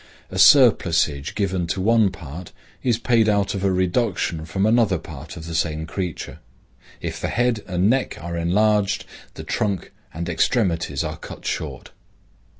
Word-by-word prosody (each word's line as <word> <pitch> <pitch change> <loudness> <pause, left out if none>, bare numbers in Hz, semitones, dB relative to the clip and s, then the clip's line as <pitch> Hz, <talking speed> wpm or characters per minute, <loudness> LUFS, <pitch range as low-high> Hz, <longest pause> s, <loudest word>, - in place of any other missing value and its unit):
A - - -3
surplusage 80 - +5
given 95 -4 -1
to 90 - -2
one 110 0 +3
part 85 -1 -9 0.3
is 120 -3 +1
paid 115 -2 +2
out 100 -1 +1
of 100 -1 -4
a 100 - +2
reduction 90 -3 0
from 95 +6 -1
another 110 -4 +3
part 75 0 -10
of 80 - -8
the 85 - -6
same 80 -1 -1
creature. 90 -1 -5 0.6
If - - -5
the - - -1
head 120 -2 0
and 90 +1 +1
neck 130 +3 +1
are 85 +1 -5
enlarged, 100 +4 +1 0.3
the - - -7
trunk 100 -4 -2 0.2
and 85 +2 -5
extremities 85 - 0
are 80 0 -4
cut - - -10
short. - - -4
95 Hz, 155 wpm, -22 LUFS, 85-105 Hz, 0.6 s, surplusage